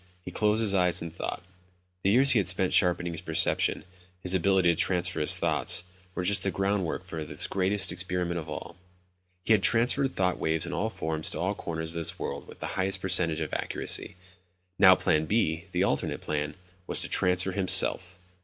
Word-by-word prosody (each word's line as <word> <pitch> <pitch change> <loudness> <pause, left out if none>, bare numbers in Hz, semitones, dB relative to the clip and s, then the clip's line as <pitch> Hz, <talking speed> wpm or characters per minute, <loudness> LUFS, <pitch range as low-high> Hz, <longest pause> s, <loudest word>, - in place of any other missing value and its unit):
He 90 - -7
closed 105 +4 +1
his 100 -3 +3
eyes 90 -2 +2
and 85 -1 -8
thought. 90 - -5 0.6
The 95 - 0
years 130 +6 +5
he 120 - +3
had 95 - -2
spent 95 0 +1
sharpening 90 -1 +2
his 80 - -5
perception, - - +1 0.4
his 90 0 0
ability 95 0 +2
to - - -6
transfer 90 +1 +1
his 75 - +5
thoughts, - - +2 0.3
were 90 - -3
just 100 +3 +3
the 100 - -1
groundwork 95 -3 -2
for 80 -4 -6
this 75 +2 -1
greatest 95 0 +1
experiment 90 -1 -3
of 80 -1 -9
all. - - -8 0.7
He - - -1
had 105 - +2
transferred 120 +7 +2
thought 90 -1 -1
waves 80 0 0
in - - -6
all 110 - -2
forms 80 -6 -2
to - - -6
all 95 +3 -1
corners 80 -5 -6
of 85 - -8
this 80 - 0
world - - -6
with - - -14
the - - -4
highest 95 0 -2
percentage 85 -4 -1
of 80 - -5
accuracy. - - -3 0.6
Now 95 -1 +7
Plan 80 -3 0
B, 85 -6 -1
the 90 +1 0
alternate - - -2
plan, 75 0 -4 0.3
was - - +4
to - - -3
transfer 90 +1 +1
himself! 95 -1 +2
90 Hz, 195 wpm, -27 LUFS, 85-95 Hz, 0.7 s, Now